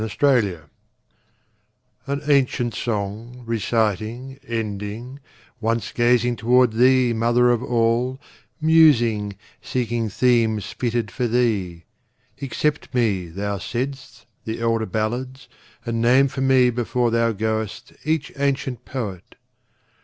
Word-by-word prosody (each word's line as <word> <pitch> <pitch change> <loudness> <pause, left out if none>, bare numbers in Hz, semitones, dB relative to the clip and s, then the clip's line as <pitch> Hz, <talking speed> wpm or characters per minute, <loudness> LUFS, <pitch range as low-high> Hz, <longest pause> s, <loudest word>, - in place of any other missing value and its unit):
Old 110 - -2
Chants 105 - +1 1.4
An 140 +1 -2
ancient 130 -4 +2
song, 110 +3 -4
reciting, 115 +3 -1
ending, 110 +3 -5 0.4
Once 115 0 -1
gazing 120 0 +2
toward 125 +2 +4
thee, 125 +1 +4
Mother 120 +2 +3
of 120 - +1
All, 120 +2 0 0.4
Musing, 120 -11 +4 0.3
seeking 120 -3 -2
themes 110 -1 +1
fitted 120 -4 -2
for 120 +5 -1
thee, 105 -8 0 0.6
Accept 145 +3 -2
me, 100 -7 +1
thou 100 +4 -4
saidst, 130 +5 -5 0.2
the 110 +1 -4
elder 115 -1 0
ballads, 125 +6 -3 0.4
And 115 -1 -2
name 130 +4 +4
for 135 - -5
me 130 -2 +4
before 120 0 0
thou 115 0 +2
goest 110 0 -3
each 155 0 -1
ancient 140 -3 -1
poet. 105 -9 -6
120 Hz, 110 wpm, -22 LUFS, 110-125 Hz, 1.4 s, toward